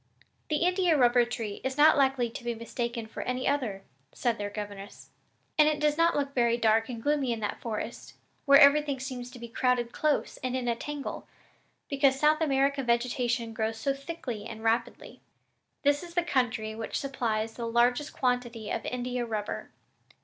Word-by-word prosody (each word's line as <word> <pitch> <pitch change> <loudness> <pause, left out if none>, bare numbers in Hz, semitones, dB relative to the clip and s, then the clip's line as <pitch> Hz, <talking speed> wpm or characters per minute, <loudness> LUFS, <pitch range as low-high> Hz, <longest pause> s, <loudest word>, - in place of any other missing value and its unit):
"The 305 - +1
India 360 -3 +3
rubber 245 -2 +5
tree 225 -3 -5
is 265 +1 -2
not 305 +2 +7
likely 265 -3 +2
to 235 +2 -9
be 240 -1 -2
mistaken 235 0 -4
for 220 - -7
any 250 +1 -2
other," 240 -9 -1 0.3
said 235 -3 -1
their 205 0 -3
governess, 205 -1 -8 0.5
"and 300 - +7
it 300 -1 -1
does 300 0 +2
not 335 +1 +3
look 280 -1 -1
very 235 -2 +2
dark 225 0 +2
and 240 -2 -5
gloomy 290 -4 +1
in 230 - -2
that 210 - -3
forest, 230 +1 -5 0.3
where 280 -1 +8
everything 285 -1 +5
seems 255 -2 -6
to 250 - -12
be 235 0 -8
crowded 240 0 0
close 305 -2 0
and 255 0 -3
in 255 -1 -2
a 235 - +1
tangle, 290 +3 -6 0.6
because 275 -1 +2
South 305 +2 +3
American 275 -2 +1
vegetation 235 -1 0
grows 220 0 -2
so 275 +5 0
thickly 275 -7 -6
and 220 0 -8
rapidly. 225 +1 -1 0.6
This 285 0 +3
is 345 -1 -10
the 350 - +2
country 235 -8 0
which 220 0 -4
supplies 225 -5 -2
the 235 0 -5
largest 245 +5 +2
quantity 245 -4 -2
of - - -2
India 250 0 -2
rubber. 215 -3 -4
245 Hz, 180 wpm, -28 LUFS, 230-280 Hz, 0.6 s, where